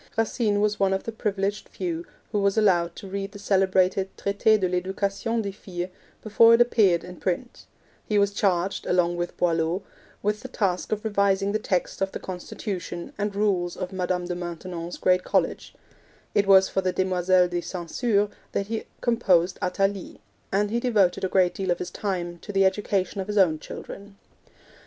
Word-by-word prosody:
Racine 220 -2 +1
was 210 0 +1
one 195 -1 +3
of 190 - -1
the 230 - -4
privileged 200 -2 -2
few 170 -2 -4 0.2
who 210 - +1
was 200 +1 +1
allowed 175 -5 +3
to 195 - -9
read 195 +1 -4
the - - -8
celebrated 190 -1 +2
Traite 205 +2 +2
de 185 - +1
l'Education 195 +5 -1
des 200 - -3
Filles 180 -2 -6 0.3
before 230 +2 +6
it 235 - +3
appeared 210 -8 +4
in 180 0 -10
print; 190 +7 -4 0.4
he 210 - +1
was 200 0 +3
charged, 190 -2 0
along 175 -1 +2
with 175 0 -4
Boileau, 170 +2 +1 0.4
with 210 +1 0
the 260 - -8
task 195 -7 -1
of 215 +1 -2
revising 200 -1 +2
the 215 - 0
text 185 -3 -2
of 195 0 0
the - - -4
constitution 180 -1 -6
and 205 -1 -2
rules 190 -4 0
of 185 - -5
Madame 180 -1 -1
de 175 - -3
Maintenon's 175 0 -6
great 180 0 +2
college; - - -1 0.6
it 200 -1 +2
was 190 -1 +7
for 190 - -1
the 185 -1 0
Demoiselles 185 -1 +2
de 175 0 -1
St. 175 -2 -6
Cyr 210 -4 +2 0.3
that 200 - 0
he 225 +1 -4 0.2
composed 185 -7 +2
Athalie; 195 +1 -1 0.3
and 205 +1 +1
he 235 - +1
devoted 210 -8 +2
a 190 - +1
great 185 -2 +3
deal 190 -1 -4
of 175 - +2
his 180 - -5
time 175 -4 -3
to 205 - -8
the 195 -1 +3
education 195 0 0
of 190 - -6
his 210 0 -2
own 165 -6 +4
children. 200 +5 -9
195 Hz, 185 wpm, -25 LUFS, 180-205 Hz, 0.6 s, was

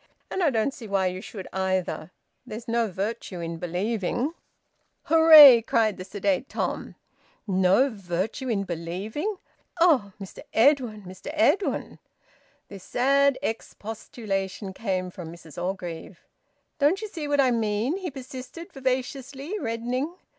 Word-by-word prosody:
And 380 - -1
I 335 - +4
don't 235 +1 0
see 230 -5 -9
why 195 -2 +1
you 185 0 -2
should, 195 -2 -8
either. 185 -4 -1 0.3
There's 225 +3 -8
no 230 0 +1
virtue 195 -1 -4
in 165 0 -4
believing." 205 - -1 0.7
"Hooray," 310 -6 +9
cried 220 -2 +1
the 185 - -6
sedate 200 +5 -1
Tom. - - -3 0.5
"No 190 +5 +3
virtue 200 +3 -3
in 205 -4 0
believing! 195 - -4 0.4
Eh, 300 - +4
Mr 195 -2 -9
Edwin! 235 -4 +3
Mr 185 +7 -9
Edwin!" 350 +5 +1 0.7
This 195 -2 -11
sad 275 +2 +3
expostulation 210 -4 -4
came 185 -3 -2
from 170 -3 -8
Mrs 170 -1 -10
Orgreave. 175 -1 -5 0.5
"Don't 315 +9 +2
you - - -3
see 325 -7 -6
what 290 0 +1
I 260 -2 +5
mean?" 225 - 0
he 375 -2 -4
persisted 265 +4 -9
vivaciously, 270 +6 -3
reddening. 250 +6 -2
225 Hz, 130 wpm, -26 LUFS, 190-275 Hz, 0.7 s, Hooray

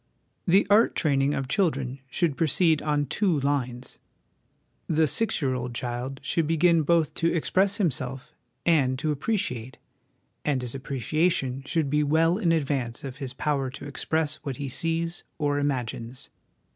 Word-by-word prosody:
The 190 +3 +5
art 210 +3 +4
training 140 -2 +2
of 135 - -2
children 135 -6 0
should 165 -3 0
proceed 160 0 +3
on 150 -1 0
two 180 -2 +1
lines. 130 -3 -2 0.9
The 160 0 +3
six 220 0 0
year 130 -1 +1
old 125 -1 -4
child 125 +2 -4
should 165 -3 0
begin 165 +1 +4
both 165 0 +2
to 165 0 +1
express 190 +4 +1
himself 135 - -2 0.3
and 140 -6 +3
to 150 +2 -1
appreci 190 - -1
ate, 115 +3 -10 0.7
and 145 -3 +1
his 120 - -2
appreciation 135 +1 -1
should 160 -2 +1
be 150 0 +3
well 165 +5 +3
in 175 -6 +2
advance 135 -7 -1
of 135 -1 -6
his 135 -3 -6
power 140 -2 0
to 130 - -9
express 155 +2 -1
what 140 -4 -6
he 140 -1 -4
sees 165 +4 -2
or 145 -2 0
imagines. 125 -3 -3
145 Hz, 155 wpm, -26 LUFS, 130-165 Hz, 0.9 s, The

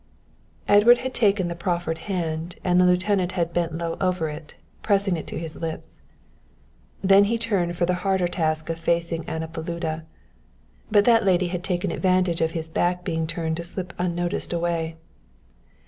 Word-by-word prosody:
Edward 210 +4 +7
had 260 - -2
taken 200 -5 +2
the 170 - -3
proffered 170 -1 -2
hand 170 -2 -2
and 180 0 +4
the 180 - +5
lieutenant 185 0 +2
had 170 -2 -1
bent 170 -2 -1
low 165 -1 -3
over 180 -4 0
it, 150 0 -9 0.3
pressing 200 -3 +2
it 160 - -6
to - - -5
his 165 -1 -5
lips. 165 -1 -6 1.0
Then 195 +1 +6
he 230 +3 0
turned 195 -7 0
for 175 - +1
the 180 - +1
harder 190 -2 +1
task 160 -2 -1
of 165 - -5
facing 170 0 0
Anna 160 0 -4
Paluda. 160 -1 -4 0.8
But 205 -2 +4
that 230 -2 +5
lady 185 -2 +2
had 175 0 -4
taken 180 -2 -1
advantage 185 -3 +1
of 160 0 +1
his 160 -1 -3
back 175 +2 0
being 160 -1 -1
turned 160 -1 -2
to 170 - -4
slip 175 0 -5
unnoticed 175 -1 -1
away. 165 -1 -1
175 Hz, 170 wpm, -24 LUFS, 165-185 Hz, 1.0 s, Edward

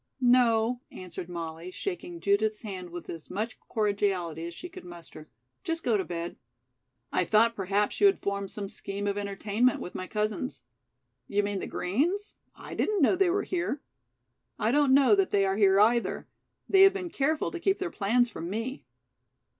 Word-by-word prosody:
"No," 245 -1 +3
answered 180 -1 -8
Molly, 165 0 -6
shaking 350 - -5
Judith's 210 +2 +1
hand 185 -4 -6
with 175 0 -8
as 165 -2 -8
much 215 +5 -4
cordiality 195 -6 0
as 170 - -8
she 355 - -7
could 370 +1 -11
muster. 170 -3 -12 0.3
"Just 330 0 -3
go 235 - +2
to 195 - +1
bed." 170 0 -5 0.8
"I - - +3
thought 230 +2 +3
perhaps 200 +1 0
you 405 - +8
had 395 - +3
formed 200 -1 -3
some 200 0 -5
scheme 200 +1 -5
of 200 -1 0
entertainment 205 +4 0
with 180 - -7
my 185 - -5
cousins." 215 +5 -2 0.6
"You 205 0 +1
mean 200 -1 -2
the - - -4
Greens? 345 - -1 0.2
I - - -9
didn't 415 -6 +1
know 275 - +5
they 380 -1 +3
were 400 +3 +1
here." 345 -5 -2 0.8
"I 220 - +1
don't 280 -1 +4
know 280 +6 +6
that 390 -2 +3
they 200 -1 +3
are 195 0 0
here, 195 -2 +5
either. 230 +3 +2 0.4
They 385 -1 +5
have 390 0 +8
been 365 -3 -5
careful 305 +1 0
to 350 - -5
keep 390 +3 +2
their 365 -2 -3
plans 235 +4 +2
from 175 -7 -6
me." 230 +7 -4
215 Hz, 180 wpm, -28 LUFS, 195-285 Hz, 0.8 s, you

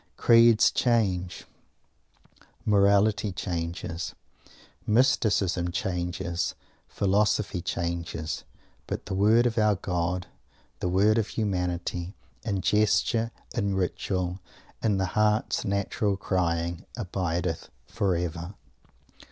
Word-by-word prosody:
Creeds 115 -1 +6
change, 95 -7 0 1.2
Morality 100 0 +3
changes, 85 -2 -4 0.7
Mysticism 105 -7 +2
changes, 85 -1 -2 0.3
Philosophy 100 -1 +1
changes 85 -2 -3 0.4
but - - -4
the - - -4
Word 110 +5 +4
of 115 -1 +1
our 105 -1 +4
God 90 0 -2 0.5
the 90 - -1
Word 105 +5 +4
of 110 - -1
Humanity 90 -3 -2 0.3
in 100 -5 -1
gesture, 110 +4 +2 0.2
in 100 -1 0
ritual, 90 0 -2 0.4
in 105 -3 +2
the 95 - +1
heart's 105 0 +2
natural 100 0 0
crying 85 -2 -1
abideth 90 -5 -2 0.2
forever! 90 -3 -2
95 Hz, 90 wpm, -27 LUFS, 90-105 Hz, 1.2 s, Creeds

